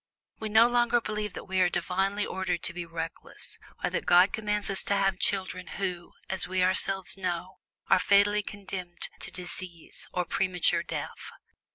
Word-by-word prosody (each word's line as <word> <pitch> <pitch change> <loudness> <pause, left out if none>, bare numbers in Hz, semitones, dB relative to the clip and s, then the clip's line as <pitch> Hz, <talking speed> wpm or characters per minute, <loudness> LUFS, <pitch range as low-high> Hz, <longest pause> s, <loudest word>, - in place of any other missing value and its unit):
We 220 - -3
no 220 +2 +7
longer 240 0 +3
believe 210 -3 -3
that - - -7
we 190 0 0
are 180 - +5
divinely 195 +4 0
ordered 180 -3 -2
to 185 - 0
be 175 -1 -5
reckless, 165 0 -6 0.2
or - - +1
that - - -2
God 180 +2 +6
commands 210 -1 +1
us 195 - +8
to 200 - +1
have 195 -1 +1
children 185 -2 -1
who, 180 -3 -3
as 190 -1 0
we 185 0 +1
ourselves 190 +1 +1
know, 180 -1 -3 0.3
are - - +5
fatally 200 +2 +4
condemned 190 -4 -5
to - - -3
disease 180 -2 -7
or 180 -1 -1
premature 180 0 +1
death. - - -6
190 Hz, 170 wpm, -28 LUFS, 180-200 Hz, 0.3 s, us